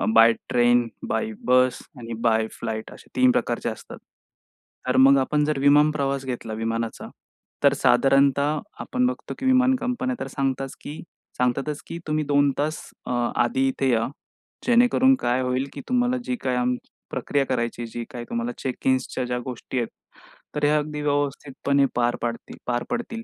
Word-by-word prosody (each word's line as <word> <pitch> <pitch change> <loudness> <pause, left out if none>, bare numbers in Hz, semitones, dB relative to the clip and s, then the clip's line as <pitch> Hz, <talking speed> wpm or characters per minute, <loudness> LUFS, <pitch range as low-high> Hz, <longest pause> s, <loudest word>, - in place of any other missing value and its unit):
By 115 +1 +8 0.2
train, 120 0 +4 0.2
bye 230 -1 -1
बस 125 0 +4 0.2
आणि 115 -1 -6
by 110 -2 +2
flight 110 -1 -5
असे - - -15
3 130 0 +5
प्रकारचे 120 -1 -1
असतात. 110 - -9 0.9
तर 125 - +2
मग 140 0 +7
आपण 150 +3 +1
जर 150 -2 0
विमान 145 +2 +5
प्रवास 140 -2 -1
घेतला 120 -3 -4
विमानाचा. 115 +1 -3 0.6
तर 140 -1 +6
साधारणतः 140 +3 +3 0.2
आपण 250 0 0
बघतो, 255 - -4
की 265 - -4
विमान 260 0 +4
कंपन्या 250 +1 -2
तर - - -4
सांगतात 135 -1 -2
की 150 - -7 0.4
सांगतातच 135 +4 0
की 165 - -5
तुम्ही 155 0 0
2 145 0 +3
तास 155 +2 -1 0.2
अ, - - -4 0.2
आधी 130 +3 +2
इथे 135 0 0
या. 115 -1 +2 0.6
जेणेकरून 245 +2 +5
काय 125 +2 +1
होईल 130 +1 -1
की - - -7
तुम्हाला 250 0 +2
जी 250 - -2
काही 125 -1 0
आम, 125 0 +1 0.3
प्रक्रिया 140 -1 0
करायची 120 -2 -2
जी 120 +1 -5
काय 120 - -6
तुम्हाला 115 +1 -2
चेक 130 0 -4
इन्सच्या 130 0 +1
ज्या 125 0 -2
गोष्टी 125 +1 -6
आहेत. 120 - -1 0.7
तर 150 - -2
हे - - +4
अगदी 150 0 0
व्यवस्थितपणे 140 -1 0
पार 120 0 +2
पाडतील, 115 0 -4
पार 120 0 -1
पडतील. 230 -1 -3
135 Hz, 165 wpm, -24 LUFS, 120-150 Hz, 0.9 s, By